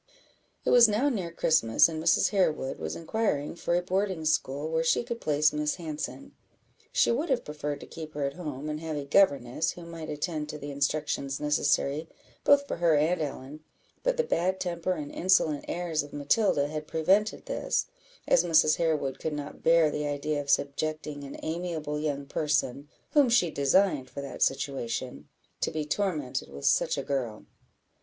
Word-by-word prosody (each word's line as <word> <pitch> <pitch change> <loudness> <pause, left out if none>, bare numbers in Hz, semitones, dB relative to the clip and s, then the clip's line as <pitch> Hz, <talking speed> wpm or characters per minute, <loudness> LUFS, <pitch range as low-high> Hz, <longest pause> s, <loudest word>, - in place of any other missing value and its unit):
It - - +2
was 240 -1 +8
now 230 +8 +2
near 195 -10 -2
Christmas, 155 -9 +4
and 160 -1 -5
Mrs. 165 +1 +3
Harewood 160 -9 0
was 80 0 -4
inquiring 165 -5 -1
for 170 0 -1
a 175 - +1
boarding 185 -2 -1
school 145 -1 0
where 160 0 0
she 165 - +2
could 235 -1 -5
place 150 0 +2
Miss 150 0 0
Hanson. 165 - -6 0.6
She - - +3
would 290 +8 -1
have 260 -3 +1
preferred 150 -1 -4
to - - -8
keep 155 -2 -9
her 145 - -2
at 140 - -2
home, 150 -4 -6
and 150 0 -3
have 160 -1 -4
a 145 - -4
governess, 140 -4 +2
who 175 - -10
might 165 -1 -8
attend 150 0 -3
to 150 - -5
the 145 0 -7
instructions 140 -1 -1
necessary 150 +1 +1 0.3
both 285 0 +5
for - - -3
her 170 -2 +3
and 160 +4 +2
Ellen; 145 0 -5 0.4
but - - 0
the 480 - +3
bad 185 - 0
temper 175 0 -1
and 150 -4 -6
insolent 165 -5 +2
airs 170 -3 -1
of 145 0 -10
Matilda 145 0 +2
had 155 0 -5
prevented 190 +8 +1
this, - - -1 0.4
as 170 - +5
Mrs. 155 -3 +4
Harewood 150 -5 0
could 160 - -3
not 145 -1 -6
bear 165 -2 +4
the 150 0 -2
idea 145 +1 -1
of 140 - -9
subjecting 145 +1 -1
an 140 - -8
amiable 160 -2 -3
young 145 -2 -2
person, 145 -1 -1 0.2
whom 285 -4 +5
she 180 -8 +3
designed 140 -1 +2
for 140 +2 -6
that 140 -2 -8
situation, 130 -2 -2 0.3
to - - 0
be 155 -1 -3
tormented 150 - -2
with 70 +1 -8
such - - +3
a - - -2
girl. 125 -6 -3
155 Hz, 180 wpm, -28 LUFS, 145-175 Hz, 0.6 s, was